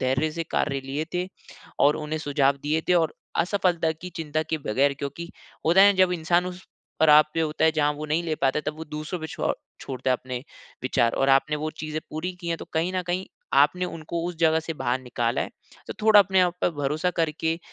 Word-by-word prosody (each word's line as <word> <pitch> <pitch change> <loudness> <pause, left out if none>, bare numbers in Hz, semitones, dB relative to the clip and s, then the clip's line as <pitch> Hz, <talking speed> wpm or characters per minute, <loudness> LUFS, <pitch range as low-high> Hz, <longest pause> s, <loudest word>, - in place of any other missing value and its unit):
धैर्य 135 +4 +1
से 165 0 -3
कार्य 140 -2 0
लिए 140 +4 -3
थे 180 0 0 0.5
और 145 +1 +5
उन्हें 155 0 -3
सुझाव 140 -2 +2
दिए 155 +2 +1
थे 180 - +5
और 165 -3 +2 0.2
असफलता 175 -2 +1
की 180 +3 -9
चिंता 155 -1 -1
किए 160 0 -3
बगैर। 140 +5 +3
क्योंकि 145 +4 -5 0.4
होता 175 +4 +6
है 200 0 +7
जब 185 -1 +4
इंसान 175 +1 +1
उस 180 0 -7 0.4
पड़ाव 150 -1 +7
पे 165 - +1
होता 155 0 0
है 160 - +5
जहाँ 150 -1 +2
वो 150 +1 -6
नहीं 155 +3 0
ले 160 -2 -1
पाता 135 +2 +1
है - - -4
तब 155 - -2
वो 160 - -5
दूसरों 155 +3 -5
पे 160 - -4
छ - - -1 0.3
छोड़ता 130 0 -3
है 125 - +3
अपने 130 0 -6 0.4
विचार 120 -2 +2
और 135 - +1
आपने 135 +3 +3
वो 155 +1 -3
चीज़ें 155 0 -4
पूरी 165 +4 -3
की 170 - -5
हैं। 165 - 0
तो - - -7
कहीं 170 +3 +1
न 185 - 0
कहीं 180 +2 -2 0.3
आपने 150 +6 +4
उनको 165 0 -4
उस 175 -2 -5
जगह 160 -1 +4
से 165 0 -5
बाहर 125 -2 -1
निकाला 120 -2 -1
है। - - -5 0.4
तो - - -3
थोड़ा 215 -1 +8
अपने 190 -1 +3
आप 180 -1 +2
पे - - +3
भरोसा 150 +5 0
करके, 160 +1 0
155 Hz, 225 wpm, -25 LUFS, 145-170 Hz, 0.5 s, थोड़ा